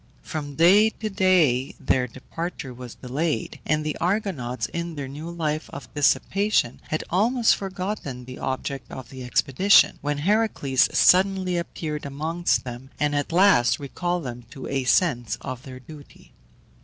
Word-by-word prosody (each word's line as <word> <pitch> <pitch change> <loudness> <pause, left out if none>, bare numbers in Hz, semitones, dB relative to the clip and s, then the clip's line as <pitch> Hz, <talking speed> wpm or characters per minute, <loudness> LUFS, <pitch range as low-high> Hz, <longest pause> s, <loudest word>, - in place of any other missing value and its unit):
From 145 -2 -5
day 195 +7 +6
to 220 -1 -6
day 170 -10 +3
their 125 -1 +1
departure 135 +3 -6
was 125 -1 -9
delayed, 145 +5 -3
and 155 0 +1
the 155 - -2
Argonauts, 165 - -1
in 170 +6 -5
their 140 -2 -5
new 150 +5 -7
life 155 -2 -3
of 135 -2 -10
dissipation, 150 - +1
had 155 - -2
almost 225 +6 +3
forgotten 185 -10 -5
the 130 0 -9
object 135 +1 -4
of 130 -3 -8
the 130 0 -8
expedition, 130 - +4
when 145 0 -1
Heracles 175 - +2
suddenly 185 0 +4
appeared 155 -3 -4
amongst 160 +5 -1
them, 125 +1 -8
and 150 0 +1
at 145 +1 -1
last 175 -9 +5
recalled 175 +5 -3
them 120 -2 -7
to 135 0 -9
a 135 -2 -2
sense 125 -5 +2
of 130 -2 -6
their 130 -1 -10
duty. 145 +2 -15
150 Hz, 150 wpm, -24 LUFS, 130-180 Hz, -, day